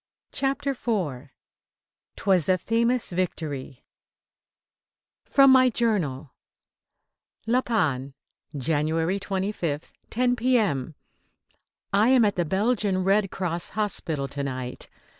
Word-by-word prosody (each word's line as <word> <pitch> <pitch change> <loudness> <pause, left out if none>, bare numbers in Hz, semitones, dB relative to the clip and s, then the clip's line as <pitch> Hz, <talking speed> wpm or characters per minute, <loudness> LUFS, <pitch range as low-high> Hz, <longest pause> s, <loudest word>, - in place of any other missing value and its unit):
CHAPTER 275 +1 0
IV 175 - -3 0.9
"'TWAS 185 -5 +2
A 185 - +4
FAMOUS 230 +5 0
VICTORY" 150 -7 -4 1.4
FROM 275 -1 +6
MY 255 -1 +6
JOURNAL: 175 - -1 1.1
LA 245 +3 +2
PANNE, 140 - -1 0.4
January 160 +6 0
25th, 190 -6 -3 0.2
10 245 +1 +1
P.M. 210 - +1 1.0
I 210 +4 +4
am 255 -3 +5
at 205 - +1
the 175 - 0
Belgian 200 +1 0
Red 195 +1 +2
Cross 175 -3 -3
hospital 160 -9 -2
to 140 +1 -5
night. 130 -2 -5
190 Hz, 100 wpm, -25 LUFS, 150-230 Hz, 1.4 s, FROM